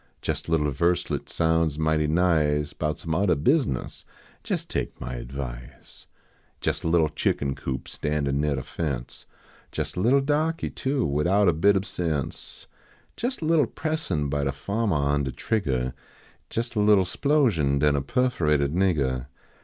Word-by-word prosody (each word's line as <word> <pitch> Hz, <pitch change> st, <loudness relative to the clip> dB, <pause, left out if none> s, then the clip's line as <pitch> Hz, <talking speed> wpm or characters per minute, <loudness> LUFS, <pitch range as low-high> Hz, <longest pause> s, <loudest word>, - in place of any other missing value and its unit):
Jes -, -, -2 dB
a -, -, -4 dB
little 75 Hz, -3 st, +2 dB
verselet 85 Hz, +5 st, 0 dB
sounds 80 Hz, -2 st, +1 dB
mighty 80 Hz, -1 st, +1 dB
nice 75 Hz, -3 st, +2 dB
Bout 75 Hz, -1 st, -2 dB
some 80 Hz, -, -4 dB
oddah 95 Hz, +1 st, +3 dB
business; 85 Hz, -, 0 dB, 0.4 s
jes -, -, -2 dB
take -, -, -4 dB
my -, -, -5 dB
advice. -, -, -8 dB, 0.5 s
Jes -, -, -1 dB
a -, -, -3 dB
little 80 Hz, -2 st, +3 dB
chicken 70 Hz, -2 st, 0 dB
coop 65 Hz, -1 st, -5 dB
standin 70 Hz, -2 st, -1 dB
neah 75 Hz, -1 st, +1 dB
de 65 Hz, -, -4 dB
fence 70 Hz, -4 st, -5 dB, 0.4 s
Jes -, -, -3 dB
a -, -, -3 dB
little 125 Hz, +8 st, +4 dB
dahkey, 155 Hz, +3 st, 0 dB
too, 135 Hz, -1 st, -1 dB
widout 90 Hz, +8 st, +2 dB
a 85 Hz, -, +5 dB
hit 100 Hz, -, +6 dB
ob 95 Hz, 0 st, 0 dB
sense; 80 Hz, -9 st, -4 dB, 0.5 s
Jes 245 Hz, -5 st, -3 dB
a -, -, -1 dB
little 160 Hz, -1 st, +3 dB
pressin 155 Hz, -, -2 dB
by 70 Hz, +1 st, -1 dB
de 70 Hz, -, 0 dB
fahmer 100 Hz, +10 st, -2 dB
on 70 Hz, 0 st, +1 dB
de 65 Hz, -, -2 dB
triggah, 65 Hz, -, -1 dB, 0.6 s
Jes 120 Hz, +1 st, -3 dB
a 110 Hz, -, -1 dB
little 105 Hz, -2 st, +5 dB
splosion, 95 Hz, -, +2 dB
den 75 Hz, 0 st, +3 dB
a 70 Hz, -, +1 dB
perforated 75 Hz, -, +1 dB
niggah. 70 Hz, -9 st, +1 dB
80 Hz, 160 wpm, -25 LUFS, 70-100 Hz, 0.6 s, hit